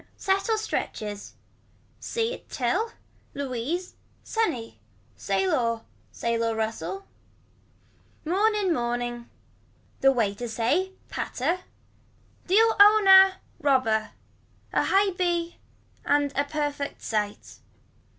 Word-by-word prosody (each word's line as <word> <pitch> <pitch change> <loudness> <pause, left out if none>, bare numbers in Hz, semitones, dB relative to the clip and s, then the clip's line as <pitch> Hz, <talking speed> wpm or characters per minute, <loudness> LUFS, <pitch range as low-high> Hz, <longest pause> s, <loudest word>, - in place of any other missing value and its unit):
Settle 390 +3 +1
stretches. 210 - -4 0.6
See 460 +1 -2
at - - -12
till. 365 - -1 0.4
Louise. 280 +6 -3 0.3
Sunny. 255 - -2 0.4
Sail 195 - 0
or. 230 -2 0 0.3
Sail 230 0 -1
or 225 -1 0
rustle. 225 - -3 1.2
Mourn 410 +7 +2
in 390 -4 +1
morning. 240 -2 -3 0.7
The 270 - +5
way 225 -6 +1
to 240 +3 -6
say. 295 +13 0 0.2
Patter. 325 +8 -2 0.9
Deal 445 +4 +4
own 415 +1 +7
a. 385 0 +9 0.3
Robber. 255 -6 +2 0.6
A - - +2
high 390 0 +3
b 345 -2 -1 0.5
and 285 -1 +1
a 285 - +1
perfect 290 -1 -3
sight. 210 -2 -3
285 Hz, 100 wpm, -26 LUFS, 230-385 Hz, 1.2 s, a